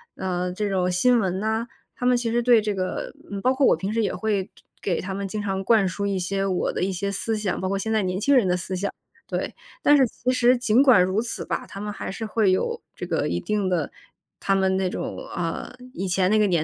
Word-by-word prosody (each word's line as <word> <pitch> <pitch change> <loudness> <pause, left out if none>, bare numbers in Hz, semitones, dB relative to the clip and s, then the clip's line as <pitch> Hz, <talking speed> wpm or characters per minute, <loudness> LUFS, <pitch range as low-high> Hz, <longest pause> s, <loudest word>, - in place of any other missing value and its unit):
呃， 180 -1 -2
这 205 +3 -2
种 185 -2 +1
新 240 +7 +4
闻 190 -3 -1
呐， 220 +3 -1 0.3
他 245 - -4
们 250 0 +4
其 235 -1 -1
实 240 +1 +2
对 240 -2 +5
这 210 -1 -1
个， 185 -1 -3 0.2
嗯， 200 -1 -4
包 255 +3 +3
括 265 +1 +2
我 - - +5
平 195 +2 -3
时 230 - +1
也 200 - -1
会 210 -3 -1
就 - - -27 0.3
给 180 -4 0
他 190 +1 -4
们 200 +1 -3
经 210 +2 -4
常 195 -1 -2
灌 210 -2 +4
输 200 +3 -3
一 200 -1 0
些 195 +2 -1
我 185 -2 0
的 - - -2
一 195 - 0
些 195 +2 -2
思 220 +3 -2
想， 205 -4 -2
包 185 - -1
括 195 - 0
现 220 +3 -2
在 220 - +3
年 185 0 -1
轻 280 +7 +3
人 245 -6 +5
的 180 0 +2
思 185 +1 -4
想。 200 +2 -2 0.3
对， - - -3 0.3
但 290 - +6
是 270 -2 +5
其 250 +1 -2
实 250 0 +4
尽 240 +1 +4
管 255 -9 +7
如 185 +4 +1
此 235 - -5
吧， - - -3
他 195 - -9
们 210 +1 -4
还 - - -5
是 220 +3 -5
会 215 -2 +2
有 185 - 0
这 - - -6
个 - - 0
一 85 0 -1
定 205 - -1
的 170 -5 0 0.5
他 195 - +1
们 190 -1 +2
那 190 -1 +1
种， - - -4
啊， 170 +5 -4 0.2
以 195 - -3
前 185 +1 +2
那 215 - +4
个 210 - +4
年 175 -5 +2
200 Hz, 280 characters per minute, -24 LUFS, 185-225 Hz, 0.5 s, 管